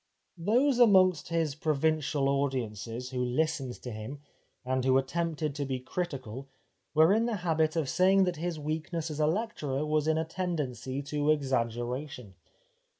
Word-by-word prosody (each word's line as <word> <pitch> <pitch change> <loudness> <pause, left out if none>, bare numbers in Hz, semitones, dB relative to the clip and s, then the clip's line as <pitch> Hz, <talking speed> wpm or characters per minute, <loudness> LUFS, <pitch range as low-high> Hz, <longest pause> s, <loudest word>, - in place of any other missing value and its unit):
Those 245 +9 +2
amongst 185 -7 +5
his 165 -3 0
provincial 150 -1 0
audiences 125 -4 -2
who 125 -1 -1
listened 130 0 -1
to 125 - -5
him, 110 +6 -6 0.5
and 130 0 0
who 130 0 +4
attempted 155 +2 -1
to 145 0 -3
be 135 -2 -2
critical, 135 -3 -5 0.5
were 160 +5 +6
in 225 +2 +2
the 235 - -1
habit 160 -1 +2
of 160 -4 0
saying 190 +6 +4
that 180 -3 -1
his 170 +1 -3
weakness 155 +2 -3
as 150 - -5
a 150 - +3
lecturer 155 - -1
was 155 0 +1
in 160 0 +2
a 160 - 0
tendency 145 - -3
to 145 +1 -1
exaggeration. 125 -3 -1
150 Hz, 150 wpm, -29 LUFS, 130-165 Hz, 0.5 s, were